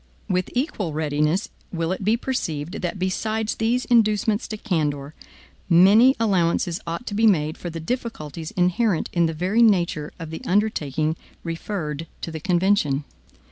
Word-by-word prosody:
With 185 -1 0
equal 245 - -1
readiness 150 +4 0 0.2
will 165 -1 -1
it 190 - -3
be 215 +4 +3
perceived, 170 - -3
that 180 +2 -2
besides 215 +4 -1
these 235 +3 0
inducements 215 -2 +2
to 215 - -5
candor, 150 -8 -2 0.6
many 205 +10 +7
allowances 175 -5 +1
ought 170 +8 -4
to - - -5
be 225 +2 +4
made 155 -6 +2
for 175 - -6
the 165 0 -6
difficulties 165 - -4
inherent 180 0 +1
in 170 -1 +3
the 165 - -2
very 185 +8 +1
nature 175 -9 +2
of 165 -2 -7
the 160 - -6
undertaking 160 -6 0 0.3
referred 165 -2 -4
to 165 - -4
the 160 - -5
convention. 175 -5 +2
180 Hz, 150 wpm, -23 LUFS, 160-215 Hz, 0.6 s, many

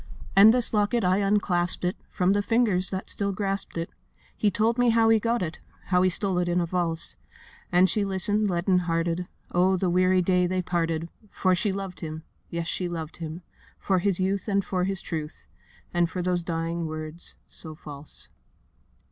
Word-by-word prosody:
'And 200 +3 +9
this 245 -1 +2
locket, 215 +3 +2
I 185 +1 +3
unclasped 190 -4 +2
it 180 - 0
From 185 0 +1
the 205 +1 +2
fingers 205 -5 +2
that 190 0 -4
still 200 -1 -2
grasped 195 -2 -3
it: 165 +1 -3 0.4
He 210 - +2
told 225 +5 +1
me 245 -1 +4
how 225 0 +4
he 225 -1 +5
got 230 0 0
it, 165 -1 -5 0.3
How 180 -1 +4
he 185 - +4
stole 185 0 0
it 175 -1 0
in 175 +1 +2
a 175 - +1
valse.' 170 -1 -1 0.5
And 180 +1 +5
she 205 +3 +1
listened 205 +2 +1
leaden 180 +1 +2
hearted: 170 0 -1 0.2
Oh, 185 +2 +3
the 180 -1 0
weary 185 +1 +3
day 180 0 +3
they 185 0 -1
parted! 165 -2 -1 0.2
For 185 -1 +1
she 195 +3 +1
loved 195 -2 -5
him—yes, 160 +1 -7
she 175 +2 -2
loved 165 -2 -5
him— 165 +1 -6 0.3
For 190 -2 +1
his 190 0 0
youth 195 +2 0
and 200 -2 +1
for 180 -1 0
his 195 -1 -2
truth, 155 -2 -6 0.5
And 175 -1 +2
for 180 0 -3
those 180 -1 +1
dying 165 0 -2
words, 155 +1 -6
so 160 -2 -7
false. 145 -1 -8
180 Hz, 185 wpm, -26 LUFS, 170-200 Hz, 0.5 s, And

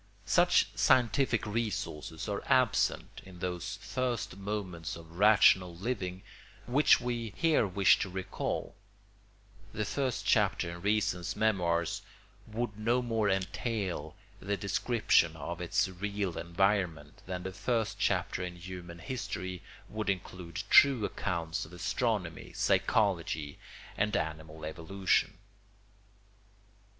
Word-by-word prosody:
Such - - +3
scientific 125 -1 +3
resources 105 -8 -3
are 100 -1 -2
absent 130 -4 +2
in 95 -2 -13
those 90 -1 -4
first 125 -6 -2
moments 95 -4 -4
of 85 +1 -12
rational 95 -4 +5
living 95 -2 -3 0.4
which 135 +5 +5
we 120 -3 -3
here 160 -9 +3
wish 95 0 +4
to 95 - -2
recall; 95 +1 -3 1.0
the 110 - -2
first 130 +2 -2
chapter 100 -5 +2
in 85 0 -8
reason's 100 -4 0
memoirs 85 -6 +1 0.5
would 110 -1 -4
no 120 +3 +1
more 115 -3 +1
entail 95 -4 -2 0.2
the 100 +2 -2
description 100 -4 +2
of 85 +3 -6
its 90 +2 +1
real 100 0 -3
environment 85 -4 0
than 90 -1 -4
the 95 - -5
first 110 +2 -1
chapter 90 - 0
in 90 -1 -5
human 90 -1 -8
history 95 -5 -5 0.3
would 110 -1 -3
include 90 -2 -4
true 135 -6 +7
accounts 85 -4 -2
of 80 - -11
astronomy, 100 -2 -2
psychology, 85 -8 +1 0.4
and 105 -1 +1
animal 80 0 -5
evolution. 90 +5 0
95 Hz, 115 wpm, -31 LUFS, 85-110 Hz, 1.0 s, true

